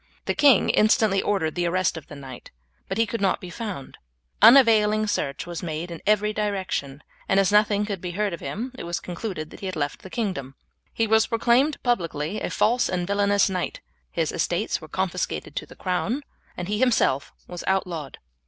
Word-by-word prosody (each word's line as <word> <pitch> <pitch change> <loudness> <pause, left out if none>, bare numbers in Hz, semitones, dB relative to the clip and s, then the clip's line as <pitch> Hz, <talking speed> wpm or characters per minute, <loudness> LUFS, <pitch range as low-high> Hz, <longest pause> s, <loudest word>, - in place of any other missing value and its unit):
The - - 0
king 275 -8 +5
instantly 215 -2 +3
ordered 175 -6 0
the 175 -1 0
arrest 185 +1 +1
of 160 - -8
the 145 - -10
knight, 135 -3 -10 0.4
but 195 - -2
he 230 - +3
could 230 0 -4
not 195 - +2
be 180 - -9
found; 205 - -6 0.4
unavailing 215 -4 +6
search 140 -9 -2
was 175 -1 -6
made 170 0 -4
in 165 - -7
every 210 0 +3
direction, 190 -9 -3 0.3
and 195 - +4
as 195 0 +3
nothing 210 0 +3
could 200 -4 -4
be 180 - -4
heard 205 0 -1
of 170 - -5
him 215 - -5
it - - -5
was 170 0 -3
concluded 175 -3 -5
that - - -11
he 195 - -5
had 185 - -4
left 145 -1 -3
the 190 - -10
kingdom. 185 - -3 0.4
He 225 - 0
was 220 0 +3
proclaimed 245 +6 +2
publicly 170 - -1
a - - -2
false 240 +3 +2
and 180 -1 -1
villainous 200 +1 +2
knight, 185 -3 -3 0.3
his - - -1
estates - - -1
were - - -10
confiscated - - -3
to - - -4
the - - -14
crown, 205 +10 -2 0.3
and 180 - -4
he 210 +1 -1
himself 225 - +2 0.2
was 175 -1 -7
outlawed. 175 -6 -2
195 Hz, 195 wpm, -24 LUFS, 170-215 Hz, 0.4 s, unavailing